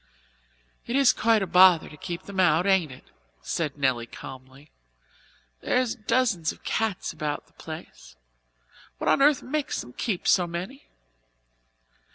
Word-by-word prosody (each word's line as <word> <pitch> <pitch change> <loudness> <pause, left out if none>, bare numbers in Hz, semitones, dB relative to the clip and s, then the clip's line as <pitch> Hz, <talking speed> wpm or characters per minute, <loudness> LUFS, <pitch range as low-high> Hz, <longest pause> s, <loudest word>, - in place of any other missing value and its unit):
"It 235 - -2
is 275 -2 +5
quite 225 -2 +2
a - - -1
bother 180 -1 +6
to - - -12
keep 175 +3 -6
them 200 -1 -6
out, 175 -1 +3
ain't 190 -7 +2
it?" 130 - -15 0.3
said 150 -4 -3
Nelly 130 -4 0
calmly. 130 +3 -12 0.9
"There's 250 -2 +1
dozens 215 -7 0
of - - -15
cats 220 -6 -2
about 150 -2 -4
the - - -30
place. - - -11 0.8
What - - -4
on - - +3
earth 290 0 +4
makes 295 +2 -2
them 125 - -12
keep 200 - -3
so 180 -2 +4
many?" 185 - -7
180 Hz, 145 wpm, -26 LUFS, 150-225 Hz, 0.9 s, bother